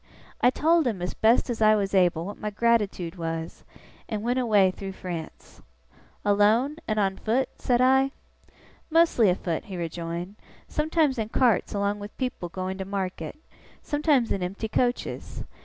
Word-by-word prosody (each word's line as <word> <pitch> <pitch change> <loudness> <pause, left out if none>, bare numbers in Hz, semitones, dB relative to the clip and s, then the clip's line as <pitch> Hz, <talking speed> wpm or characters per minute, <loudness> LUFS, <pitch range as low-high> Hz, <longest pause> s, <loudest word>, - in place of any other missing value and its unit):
I 245 - +6
told 320 +3 +2
him, 200 -7 -2 0.2
best 225 +2 +4
as 225 - -4
I 215 0 +6
was 200 -2 -1
able, 175 -3 +3
what 205 - -7
my 210 - -3
gratitoode 205 -6 0
was, 165 -1 -5 0.5
and 215 -1 -3
went 245 +2 +1
away 210 -6 +4
through 195 +1 -7
France.' 175 -4 -8 0.6
'Alone, 215 +8 +3
and 215 - -1
on 195 -2 +1
foot?' 250 +4 0
said 245 -1 +2
I. 265 +1 +4 0.8
'Mostly 325 - +4
a 180 - +3
foot,' 170 -4 -3
he 190 -3 -7
rejoined; 170 +3 -5 0.3
'sometimes 305 -4 +1
in 220 -1 -2
carts 230 -5 +2
along 200 +1 0
with 205 +1 -9
people 250 -9 -3
going 185 +2 -4
to 190 - -3
market; 195 +6 -4 0.5
sometimes 290 -5 +1
in 195 - 0
empty 195 +5 -3
coaches. 245 +2 -2
210 Hz, 155 wpm, -26 LUFS, 185-245 Hz, 0.8 s, I